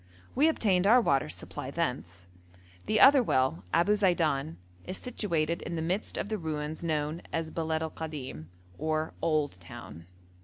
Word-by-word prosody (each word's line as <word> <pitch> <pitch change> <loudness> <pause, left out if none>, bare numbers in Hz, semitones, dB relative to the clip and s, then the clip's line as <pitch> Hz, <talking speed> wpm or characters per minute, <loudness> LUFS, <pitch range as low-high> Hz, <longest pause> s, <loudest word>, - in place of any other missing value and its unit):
We 290 +4 +4
obtained 195 - +2
our 240 +4 +7
water 135 - +1
supply 85 +2 -5
thence. 90 0 -3 0.6
The 215 - +2
other 275 0 +8
well, 130 - +1
Abu 175 +5 +3
Zeidan, 160 - +1 0.3
is 185 - -6
situated 170 -9 -1
in 170 - -5
the 160 - -2
midst 185 +6 -1
of - - -2
the 215 0 -3
ruins 155 -1 -4
known 155 0 -1
as 165 -1 -2
Beled 160 -1 -1
al 160 - -4
Kadim, 140 - -6 0.3
or 155 0 -1
'old 150 - 0
town.' 85 -1 -11
160 Hz, 155 wpm, -29 LUFS, 145-185 Hz, 0.6 s, other